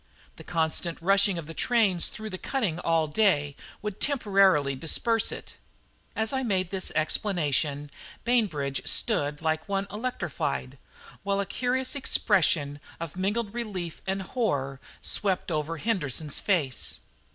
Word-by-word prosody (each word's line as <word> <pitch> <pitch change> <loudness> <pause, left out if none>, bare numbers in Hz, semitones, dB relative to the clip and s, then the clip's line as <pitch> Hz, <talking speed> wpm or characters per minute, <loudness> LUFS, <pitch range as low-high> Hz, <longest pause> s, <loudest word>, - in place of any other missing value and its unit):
The - - -10
constant 165 0 0
rushing 195 +1 +3
of 165 - -5
the 165 - -7
trains 205 -3 +3
through 215 0 -7
the 185 - -5
cutting 210 - -1
all 165 -2 +2
day 150 -6 +2 0.3
would 210 -2 -4
temporarily 195 - +3
disperse 225 - +1
it." - - -8 0.6
As 220 +3 0
I 265 - +1
made 190 -7 0
this 190 -1 0
explanation 150 -4 +1 0.3
Bainbridge 165 - +1
stood 145 +2 +1
like 160 +2 0
one 195 0 0
electrified, 160 - -3 0.4
while 200 0 0
a 200 - +1
curious 255 +5 -1
expression 165 - +2 0.2
of 165 -2 -5
mingled 200 +3 -1
relief 195 -8 -4
and 190 0 -1
horror 140 - -1 0.2
swept 190 -3 +1
over 155 +1 -1
Henderson's 155 - -1
face. 130 - 0
180 Hz, 130 wpm, -27 LUFS, 150-210 Hz, 0.6 s, rushing